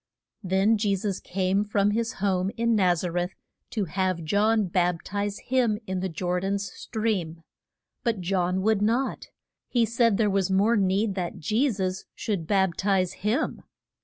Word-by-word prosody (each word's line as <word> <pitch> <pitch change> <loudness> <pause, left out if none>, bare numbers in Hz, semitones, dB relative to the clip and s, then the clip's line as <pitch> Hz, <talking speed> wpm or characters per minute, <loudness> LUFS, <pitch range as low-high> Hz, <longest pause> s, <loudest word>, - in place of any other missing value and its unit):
Then 195 +3 +2
Je 205 -2 +2
sus 195 0 -2
came 190 +2 0
from 205 -1 +1
his 230 +2 -1
home 190 -1 0
in 235 0 +2
Naz 180 -4 +2
a 175 - -2
reth 175 +2 -2 0.3
to 210 -4 -1
have 185 0 -1
John 210 +6 +2
bap 180 -2 0
tize 205 +1 -3
him 245 -4 +1
in 185 -2 -3
Jor 180 +2 -1
dan's 200 +2 -2
stream. 190 -8 -3 0.6
But 230 -5 0
John 180 0 0
would 215 -1 +2
not. 235 +5 0 0.4
He 240 -2 +3
said 230 -2 +2
there 220 - +3
was 195 -1 +1
more 200 +5 +3
need 200 +1 +1
that 180 -3 -3
Je 220 - +1
sus 190 -2 -3
should 190 -7 -3
bap 190 -3 +2
tize 190 -1 +1
him. 220 - 0
195 Hz, 165 wpm, -26 LUFS, 185-215 Hz, 0.6 s, He